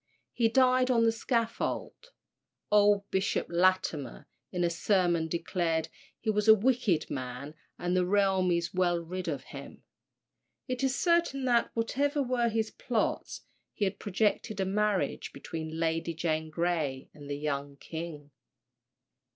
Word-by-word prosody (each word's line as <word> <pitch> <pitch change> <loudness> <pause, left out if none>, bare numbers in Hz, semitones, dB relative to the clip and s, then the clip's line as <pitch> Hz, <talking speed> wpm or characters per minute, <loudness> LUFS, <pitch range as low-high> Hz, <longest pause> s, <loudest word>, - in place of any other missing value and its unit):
He 230 -2 +2
died 255 +1 +4
on 235 -2 +4
the 225 - +4
scaffold. 230 - -2 0.6
Old 205 -1 +4
Bishop 190 +1 0
Latimer, 175 -6 +1 0.2
in 180 -1 -1
a 170 - +3
sermon, 175 -2 +2
declared 165 -1 -1 0.3
"he 220 - 0
was 210 0 0
a 220 - +10
wicked 220 -7 +1
man, 130 +2 -5 0.2
and 180 +1 -1
the 180 -1 +2
realm 190 -2 +3
is 170 0 0
well 180 -2 +2
rid 180 +2 -5
of 140 -5 -3
him." 140 +1 -10 0.8
It 255 -1 -3
is 265 -1 +1
certain 340 -6 +2
that, 240 -2 +3
whatever 280 +5 0
were 245 -2 +1
his 220 -1 -1
plots, 230 -4 -2 0.3
he 205 - +1
had 195 0 -3
projected 210 +1 0
a 190 - +1
marriage 205 0 0
between 160 -1 -6
Lady 165 0 -1
Jane 160 -1 -1
Grey 155 -5 -1
and 145 -1 -11
the 145 - -2
young 140 -1 -3
king. 160 -2 -7
185 Hz, 145 wpm, -30 LUFS, 160-225 Hz, 0.8 s, a